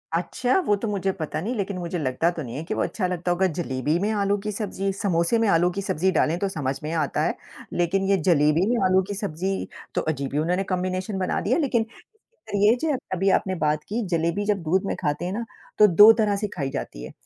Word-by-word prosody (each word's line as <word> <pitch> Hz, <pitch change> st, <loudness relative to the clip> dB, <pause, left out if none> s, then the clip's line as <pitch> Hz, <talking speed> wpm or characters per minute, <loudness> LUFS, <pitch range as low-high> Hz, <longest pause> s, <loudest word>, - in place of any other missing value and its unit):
अच्छा, 245 Hz, -, 0 dB
वो 205 Hz, -, +3 dB
तो 210 Hz, +3 st, -4 dB
मुझे 195 Hz, -2 st, 0 dB
पता 155 Hz, -4 st, -4 dB
नहीं, 220 Hz, +8 st, -2 dB
लेकिन 200 Hz, -3 st, -3 dB
मुझे 175 Hz, 0 st, -3 dB
लगता 135 Hz, +4 st, +1 dB
तो 170 Hz, -, -6 dB
नहीं 120 Hz, -2 st, -7 dB
है 150 Hz, -, -4 dB
कि 165 Hz, -, -4 dB
वो -, -, -1 dB
अच्छा 190 Hz, -4 st, -2 dB
लगता 180 Hz, 0 st, -2 dB
होगा 185 Hz, +2 st, +2 dB
जलेबी 150 Hz, -1 st, -1 dB
में 205 Hz, -, 0 dB
आलू 200 Hz, -1 st, +1 dB
की 210 Hz, -, -1 dB
सब्ज़ी? 195 Hz, -2 st, -2 dB
समोसे 190 Hz, +1 st, +1 dB
में 225 Hz, -, +2 dB
आलू 175 Hz, -1 st, +4 dB
की 195 Hz, +3 st, -4 dB
सब्ज़ी 190 Hz, -1 st, 0 dB
डालें 165 Hz, -2 st, +1 dB
तो 200 Hz, -, 0 dB
समझ 140 Hz, -6 st, -2 dB
में 155 Hz, -, -3 dB
आता 155 Hz, -4 st, 0 dB
है, -, -, 0 dB, 0.4 s
लेकिन 175 Hz, +3 st, +1 dB
ये 200 Hz, -, +4 dB
जलेबी 155 Hz, +2 st, +4 dB
में 245 Hz, -, +2 dB
आलू 185 Hz, 0 st, +4 dB
की 205 Hz, -, -3 dB
सब्ज़ी 190 Hz, 0 st, -3 dB, 0.3 s
तो -, -, +2 dB
अजीब 140 Hz, -3 st, -2 dB
ही 145 Hz, -, +1 dB
उन्होंने 180 Hz, +5 st, 0 dB
कंबिनेशन 185 Hz, +2 st, -2 dB
बना 185 Hz, -, 0 dB
दिया, 235 Hz, +6 st, +1 dB
लेकिन 245 Hz, -8 st, +1 dB, 0.7 s
ये 205 Hz, +3 st, +5 dB
जो 310 Hz, -3 st, +1 dB, 0.2 s
अभी 190 Hz, +2 st, +1 dB
आपने 190 Hz, 0 st, +1 dB
बात 150 Hz, -2 st, 0 dB
की 225 Hz, +4 st, -1 dB
जलेबी 170 Hz, +5 st, 0 dB
जब 205 Hz, -3 st, 0 dB
दूध 185 Hz, +5 st, +1 dB
में -, -, -1 dB
खाते 150 Hz, 0 st, -1 dB
हैं 180 Hz, -, -3 dB
ना, 230 Hz, +3 st, -3 dB, 0.3 s
तो 210 Hz, -, +8 dB
2 205 Hz, +5 st, +9 dB
तरह 215 Hz, -3 st, +1 dB
से 210 Hz, 0 st, -2 dB
खाई 140 Hz, -6 st, -2 dB
जाती -, -, -5 dB
है, -, -, -8 dB
185 Hz, 235 wpm, -24 LUFS, 165-205 Hz, 0.7 s, 2